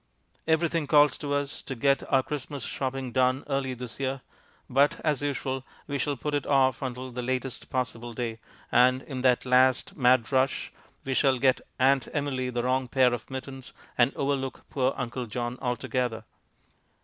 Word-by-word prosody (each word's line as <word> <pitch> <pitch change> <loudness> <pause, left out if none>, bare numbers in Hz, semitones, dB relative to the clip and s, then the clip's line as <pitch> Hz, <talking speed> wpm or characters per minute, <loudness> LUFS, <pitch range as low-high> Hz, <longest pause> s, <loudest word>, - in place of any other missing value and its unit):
Everything 160 -1 +1
calls 145 -1 +5
to 145 -2 -4
us 145 0 -3
to 135 - -6
get 140 +3 +2
our 135 -2 +4
Christmas 145 -1 -5
shopping 130 -1 -3
done 130 +2 +2
early 135 -2 -1
this 125 0 -7
year, 135 -1 -2 0.5
but, 140 +3 +3
as 150 -3 +1
usual, 135 -2 -2 0.2
we 140 -1 -3
shall 145 +1 -1
put 150 +5 -3
it 145 -2 -1
off 130 -3 +3
until 130 -1 -4
the 125 +1 -4
latest 130 +1 -3
possible 120 -2 -3
day, 115 -1 -4 0.3
and 130 +1 +4
in 130 -3 -5
that 125 -1 +3
last 130 0 +3
mad 125 -3 +3
rush 130 0 +1 0.3
we 135 - -1
shall 135 0 +3
get 130 0 +3 0.2
Aunt 135 0 +3
Emily 135 -4 -1
the 120 -1 -2
wrong 130 +1 +1
pair 125 0 +3
of 120 -2 -5
mittens 130 0 -7 0.2
and 120 +2 +4
overlook 135 -1 -2
poor 130 -1 +1
Uncle 125 -1 -4
John 120 +2 -4
altogether. 125 -1 -2
130 Hz, 170 wpm, -27 LUFS, 125-140 Hz, 0.5 s, calls